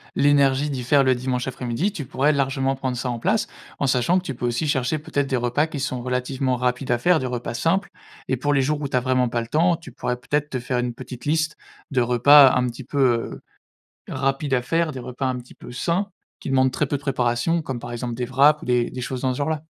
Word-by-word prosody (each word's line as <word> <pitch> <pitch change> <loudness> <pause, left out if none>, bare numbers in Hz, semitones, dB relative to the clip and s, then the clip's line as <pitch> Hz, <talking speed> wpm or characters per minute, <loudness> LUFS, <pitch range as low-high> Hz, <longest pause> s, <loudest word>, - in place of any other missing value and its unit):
l'énergie 140 0 +3
d'y 130 -2 -3
faire 140 +3 +4
le 130 - +4
dimanche 125 0 -2
après-midi, 130 - -2
tu 160 -8 -5
pourrais 145 +3 +1
largement 135 -1 0
prendre 130 -2 -3
ça 125 0 -2
en 120 - -4
place 210 - +1 0.3
en 140 - -1
sachant 130 +8 +2
que 185 - -2
tu 135 - -3
peux 120 0 -3
aussi 120 +6 -1
chercher 135 +2 0
peut-être 145 -2 -2
des 135 - 0
repas 125 +6 +1
qui 150 -3 -6
sont 130 -2 -2
relativement 125 +1 -1
rapides 125 +1 -1
à 120 - +3
faire, 175 +6 +3
des 130 - -3
repas 120 -1 -4
simples 175 +9 0 0.4
et 130 - 0
pour 145 +3 0
les 135 - +3
jours 150 +2 -1
où 140 - -2
tu 130 - 0
as - - +4
vraiment 130 -1 +1
pas 120 0 -1
le 115 - -7
temps, 170 +6 +3
tu 170 - -12
pourrais 125 - -3
peut-être 150 +3 -1
te 130 - -3
faire 125 0 -2
une 120 -1 -2
petite 125 +1 -9
liste 155 +1 0 0.3
de 130 - +2
repas 130 +3 +7
un 125 - +2
petit 120 +3 -7
peu, 140 +3 -4 0.3
heu, - - -10 0.7
rapide 135 +1 -1
à 125 - +3
faire, 165 +5 0
des 130 - -7
repas 125 +2 -5
un 130 -1 -1
petit 125 - -15
peu - - -11
sains 170 +10 -1 0.3
qui - - -6
demandent 130 -1 +3
très 150 - 0
peu 140 +1 -2
de - - -14
préparation 135 +5 0
comme 130 -4 -4
par 120 - -8
exemple 120 0 -4
des 125 +1 -3
wraps 140 +4 +4
ou - - -9
des 125 -1 +1
des 125 - -6
choses 125 0 -4
dans 130 -1 0
ce - - -6
genre 145 +2 0
là. 155 -1 -2
130 Hz, 260 wpm, -23 LUFS, 125-145 Hz, 0.7 s, repas